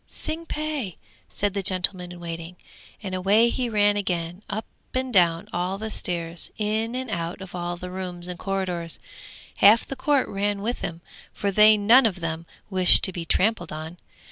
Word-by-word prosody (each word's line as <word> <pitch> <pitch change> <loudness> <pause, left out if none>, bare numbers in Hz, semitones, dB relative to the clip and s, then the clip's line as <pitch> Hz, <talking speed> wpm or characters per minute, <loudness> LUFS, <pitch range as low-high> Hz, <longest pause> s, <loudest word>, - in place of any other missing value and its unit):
'Tsing 325 +1 -6
pe!' 300 - -3 0.4
said 205 -1 -1
the 200 - -2
gentleman 185 -1 0
in 175 - -10
waiting, 170 0 -7 0.5
and 190 -2 -5
away 200 +5 +3
he 245 0 -2
ran 205 -1 +3
again, 175 -2 -3
up 215 +2 -4 0.3
and 255 -1 -2
down 170 -3 +3
all 180 +2 -2
the 220 +1 -5
stairs, 170 -3 -2
in 220 +2 -1
and 255 -2 -4
out 170 -2 -4
of 190 -1 -10
all 175 0 -4
the 180 +1 -8
rooms 180 -2 -6
and 180 -1 -7
corridors; 180 -4 -3 0.6
half 215 +3 +6
the 275 - -6
court 280 0 +1
ran 200 0 -2
with 240 +3 -2
him, 165 0 -6 0.3
for 200 -1 -2
they 215 +2 +6
none 230 +5 +6
of 190 -4 -4
them 165 0 -4 0.2
wished 185 -3 +8
to 190 - +3
be 170 -1 -5
trampled 185 0 +1
on. 160 +3 -7
190 Hz, 180 wpm, -24 LUFS, 175-215 Hz, 0.6 s, wished